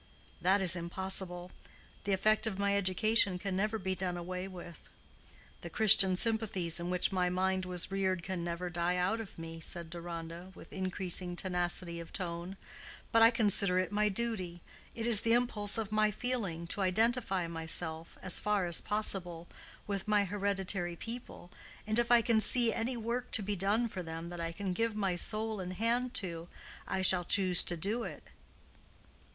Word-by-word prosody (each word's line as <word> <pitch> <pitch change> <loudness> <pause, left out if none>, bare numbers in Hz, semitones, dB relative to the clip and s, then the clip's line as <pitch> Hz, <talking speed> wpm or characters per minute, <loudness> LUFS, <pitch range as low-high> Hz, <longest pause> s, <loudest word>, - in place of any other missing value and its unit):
"That 195 +2 +3
is 185 -2 +8
impossible. 180 0 +1 0.5
The 200 - -1
effect 215 +3 +2
of 205 -3 -4
my 200 0 0
education 200 0 +2
can 195 0 -4
never 215 +3 -1
be 190 -2 -3
done 180 -1 -3
away 180 +2 -5
with. 175 -2 -12 0.7
The - - -8
Christian 195 -4 +7
sympathies 195 -6 -1
in 170 +1 -5
which 180 0 0
my 180 -1 0
mind 185 +1 -1
was 180 0 -2
reared 190 -2 -1
can 185 -2 -4
never 175 +1 -4
die 175 +1 -1
out 185 +5 -1
of 215 - -11
me," 165 0 -8
said 170 0 -5
Deronda, 170 +1 -8
with - - -14
increasing 185 -1 0
tenacity 175 -1 0
of 170 - -10
tone. 175 +1 -5 0.5
"But 230 - +4
I 225 - +8
consider 205 -5 +2
it 185 -1 -1
my 210 +1 +1
duty—it 200 0 -5
is 230 -3 +6
the 230 - +2
impulse 225 -4 +2
of 220 -2 -4
my 215 0 +2
feeling—to 200 -6 -3
identify 195 -1 0
myself, 160 0 -5
as 185 -2 +1
far 210 -3 0
as 170 -1 +4
possible, 180 -5 -2 0.4
with 200 0 -4
my 210 -1 +2
hereditary 195 -2 -1
people, 230 -4 -9 0.3
and 215 +2 +2
if 235 -1 0
I 240 -1 +6
can 220 -1 +2
see 235 -1 +3
any 240 +2 -2
work 235 +2 -4
to 220 - +4
be 205 +1 -2
done 205 +5 0
for 195 -4 -6
them 165 0 -7
that 175 -1 -7
I 165 0 -3
can 190 +2 -4
give 225 +2 -1
my 195 -4 -1
soul 215 +4 +1
and 185 0 -5
hand 235 +5 -1
to 170 -3 -3 0.4
I 190 - -2
shall 185 -1 +5
choose 185 -1 +3
to 175 - -3
do 205 +8 -2
it." - - -7
190 Hz, 175 wpm, -32 LUFS, 175-215 Hz, 0.7 s, is